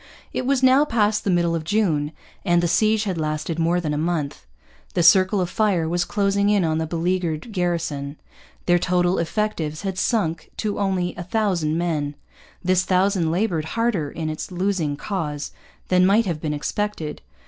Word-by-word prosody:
It 255 - -2
was 270 -1 +2
now 260 +2 +6
past 215 -6 +1
the - - -1
middle 170 -2 +2
of 165 -1 -2
June, 160 -6 +1 0.3
and 175 -2 +2
the - - +2
siege 215 +4 +2
had 190 -5 -2
lasted 155 +2 -2
more 170 +2 +2
than 155 -4 -2
a 150 - -1
month. 155 - -2 0.5
The 175 - +2
circle 185 +4 +5
of 180 - 0
fire 185 -3 +1
was 175 +1 0
closing 200 0 +1
in 205 -3 +3
on 160 0 0
the 160 - -2
beleaguered 170 +2 -2
garrison. 165 -6 -2 0.5
Their 175 0 +4
total 180 0 +1
effectives 165 -3 -2
had 190 -2 -3
sunk 170 -9 0
to 210 -2 -2
only 190 -3 0
a 175 - -4
thousand 180 -6 0
men. 155 -4 -1 0.5
This 185 0 +3
thousand 185 -2 +2
laboured 170 -2 0
harder 220 -11 +1
in 160 +1 -5
its 155 +4 -5
losing 180 -5 -1
cause 150 -6 -4 0.4
than 185 0 +4
might 215 +4 +4
have 165 -5 -3
been 150 -2 -2
expected. 160 0 -3
175 Hz, 175 wpm, -23 LUFS, 160-200 Hz, 0.5 s, now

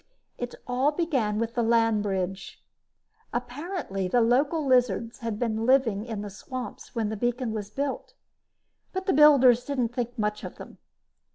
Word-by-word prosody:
It 245 0 -4
all 255 +4 +1
began 275 -11 0
with 230 +1 -2
the 240 - 0
land 225 -2 +3
bridge. 195 -1 -3 0.7
Apparently 250 - -3
the 245 +7 +2
local 280 +7 +2
lizards 245 -3 +2
had 230 -3 -3
been 225 -1 -1
living 235 -6 +3
in 220 -4 -4
the 205 - -5
swamps 255 +7 -8
when 225 -2 0
the 220 - -3
beacon 240 +1 -1
was 210 -2 -4
built, 275 +5 -4 0.8
but 375 0 -3
the 385 - +2
builders 265 -5 +6
didn't 255 -4 -1
think 245 +1 -4
much 210 -1 -1
of - - -7
them. - - -12
240 Hz, 160 wpm, -27 LUFS, 215-260 Hz, 0.8 s, builders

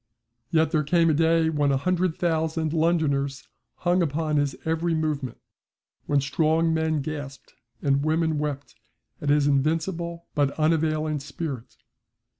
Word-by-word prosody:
Yet 160 -1 +2
there 155 -3 +2
came 165 +2 +3
a - - +2
day 165 +1 +3
when 145 -2 +1
a 135 - +2
hundred 180 +3 0
thousand 160 -2 0
Londoners 150 -4 0 0.3
hung 180 +1 +1
upon 155 -1 0
his 145 -2 0
every 165 +1 0
movement 150 -5 -2 0.7
when 145 - +3
strong 160 +3 +1
men 160 -2 0
gasped 145 -2 -7 0.3
and 140 0 +2
women 160 0 +1
wept 145 -3 -4 0.5
at 145 - -2
his 145 0 +4
invincible 165 +4 0
but 145 -2 0
unavailing 155 -1 +1
spirit. 140 -3 -6
155 Hz, 135 wpm, -25 LUFS, 145-165 Hz, 0.7 s, his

